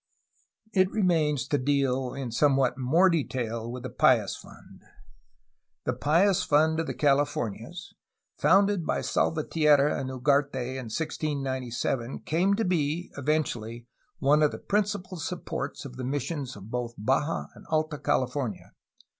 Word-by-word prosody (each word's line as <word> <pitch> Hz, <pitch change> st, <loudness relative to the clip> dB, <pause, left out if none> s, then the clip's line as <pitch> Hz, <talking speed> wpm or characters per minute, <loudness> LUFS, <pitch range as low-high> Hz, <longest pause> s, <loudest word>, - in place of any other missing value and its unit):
It 185 Hz, -1 st, +4 dB
remains 160 Hz, -10 st, +1 dB
to 145 Hz, -, +1 dB
deal 135 Hz, -2 st, 0 dB
in 135 Hz, -3 st, -4 dB
somewhat 135 Hz, 0 st, +3 dB
more 140 Hz, +9 st, +3 dB
detail 120 Hz, -8 st, -1 dB
with 125 Hz, 0 st, -7 dB
the -, -, -5 dB
Pious -, -, +3 dB
Fund. -, -, -15 dB, 1.0 s
The -, -, 0 dB
Pious 180 Hz, +6 st, +3 dB
Fund 160 Hz, 0 st, +3 dB
of 165 Hz, -, -2 dB
the -, -, -4 dB
Calif 145 Hz, 0 st, +2 dB
ornias, 120 Hz, -, -5 dB, 0.4 s
founded 200 Hz, -1 st, +3 dB
by -, -, -1 dB
Salvatierra 150 Hz, -2 st, +2 dB
and 130 Hz, -, -4 dB
Ugarte 140 Hz, +2 st, +1 dB
in 130 Hz, 0 st, -4 dB
1697, 130 Hz, -4 st, -3 dB
came 185 Hz, +5 st, +1 dB
to 225 Hz, -, 0 dB
be, 170 Hz, -1 st, -1 dB
eventually, 120 Hz, -6 st, -2 dB, 0.3 s
one 145 Hz, +2 st, +3 dB
of 150 Hz, -, +5 dB
the -, -, -7 dB
prin 210 Hz, +1 st, +1 dB
cipal 185 Hz, -3 st, -6 dB
supports 150 Hz, -4 st, -5 dB
of 125 Hz, -2 st, -9 dB
the 130 Hz, -, -5 dB
missions 140 Hz, 0 st, -3 dB
of 100 Hz, +2 st, -11 dB
both 120 Hz, -1 st, -3 dB
Baja 135 Hz, +8 st, 0 dB
and -, -, -16 dB
Alta 155 Hz, -1 st, 0 dB
Cal 140 Hz, -3 st, +1 dB
ifornia. 125 Hz, -4 st, -5 dB
145 Hz, 145 wpm, -27 LUFS, 130-160 Hz, 1.0 s, of